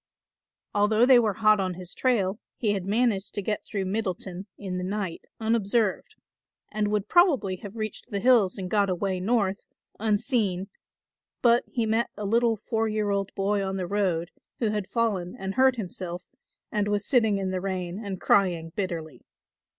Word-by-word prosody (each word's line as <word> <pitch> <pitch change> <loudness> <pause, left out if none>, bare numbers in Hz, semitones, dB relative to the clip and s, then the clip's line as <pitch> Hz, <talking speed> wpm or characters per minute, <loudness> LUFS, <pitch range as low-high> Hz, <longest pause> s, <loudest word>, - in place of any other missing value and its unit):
Although 215 +3 +4
they 255 -1 +7
were 215 -4 +1
hot 215 0 +4
on 185 -2 -1
his 180 0 -7
trail 210 -5 +1 0.2
he 215 -4 +1
had 195 -3 -3
managed 210 -2 +1
to 205 - -1
get 210 +1 -2
through 200 -3 -3
Middleton 190 -1 -3
in 185 -3 -4
the - - -3
night 190 -2 -3
unobserved 220 -2 0 0.6
and 210 -1 0
would 210 -1 -1
probably 275 - +3
have 205 +2 -9
reached 215 +2 -5
the 200 -4 -2
hills 215 -4 +4
and 190 -2 -4
got 200 +1 +2
away 185 +1 -1
North, 200 -1 +1 0.4
unseen; 210 -3 0 0.7
but 235 0 +5
he 235 -2 -1
met 225 +2 +1
a 210 - -4
little 230 +2 +3
four 225 +1 -1
year 215 -1 0
old 200 -1 -1
boy 200 +1 +1
on 190 0 -2
the 185 - -2
road, 175 -3 0 0.3
who 225 - 0
had 210 -2 -2
fallen 210 -5 -1
and 190 -2 -4
hurt 260 +1 +4
himself 180 -4 -5 0.5
and 205 -1 0
was 205 0 0
sitting 225 -6 +3
in 190 -1 -2
the 185 -1 -2
rain 185 +1 -3
and 195 -3 -5
crying 175 -5 +2
bitterly. 165 - -4
205 Hz, 175 wpm, -26 LUFS, 190-220 Hz, 0.7 s, they